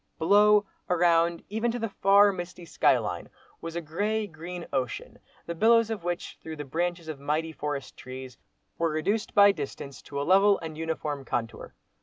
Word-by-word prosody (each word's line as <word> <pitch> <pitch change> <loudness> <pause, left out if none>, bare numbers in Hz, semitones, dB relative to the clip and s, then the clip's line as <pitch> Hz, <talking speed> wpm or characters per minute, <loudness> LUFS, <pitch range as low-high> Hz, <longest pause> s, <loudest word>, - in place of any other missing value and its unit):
Below, 205 +4 +5 0.2
around, 170 -1 +3
even 220 +3 -1
to 235 - -2
the 225 -1 -2
far, 200 +1 +5
misty 175 -1 -7
sky 155 -4 +3
line, - - -4 0.3
was 165 0 -6
a 170 - -2
grey, 205 +8 -1
green 175 0 -8
ocean, 130 -3 -3 0.3
the 170 - -4
billows 225 +5 +4
of 210 -6 -4
which, 175 0 -4
through 160 0 -7
the 145 -1 -6
branches 170 +4 -2
of 155 -3 -6
mighty 155 +3 -1
forest 145 -2 -5
trees, 130 -2 -9 0.4
were 165 0 +2
reduced 185 +8 -1
by 205 0 +8
distance 140 -4 -7
to 140 - -6
a - - -1
level 195 +3 +5
and 160 -1 -7
uniform 155 -3 -3
contour. 115 - -4
170 Hz, 175 wpm, -27 LUFS, 150-200 Hz, 0.4 s, by